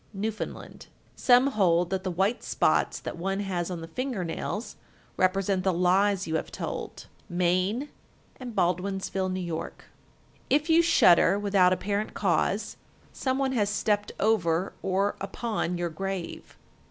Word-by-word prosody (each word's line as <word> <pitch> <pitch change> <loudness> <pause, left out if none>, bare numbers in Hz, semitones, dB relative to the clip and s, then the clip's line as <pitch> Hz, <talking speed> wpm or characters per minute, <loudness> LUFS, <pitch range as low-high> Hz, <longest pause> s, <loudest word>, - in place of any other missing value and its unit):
Newfoundland. 215 +2 -5 0.3
1370. - - -33
Some 250 +1 +6
hold 175 -2 +3
that 190 -1 -1
the 190 - -2
white 195 +6 0
spots - - +1
that - - -7
one 195 +3 -1
has 180 -3 -2
on 175 -2 -5
the 165 - -7
finger 245 +2 -3
nails 205 +6 -4 0.4
represent 185 0 +1
the 190 - +2
lies 185 +3 +2
you 160 0 0
have - - -5
told. - - -6 0.2
Maine 185 +9 0 0.5
and 245 -4 -8
Baldwinsville, 190 +1 0
N.Y. 185 -2 -3
1371. - - -5 0.8
If 300 +3 +2
you 330 +1 +6
shudder 195 - +5
without 200 -3 +3
apparent 200 +3 -2
cause, - - 0 0.4
some 260 -1 -1
one 270 -1 0
has 210 -6 +1
stepped 205 0 0
over 185 -5 +1
or 195 +2 0
upon 195 -3 -2
your 175 0 -2
grave. 190 +1 -5
195 Hz, 145 wpm, -27 LUFS, 180-210 Hz, 0.8 s, Some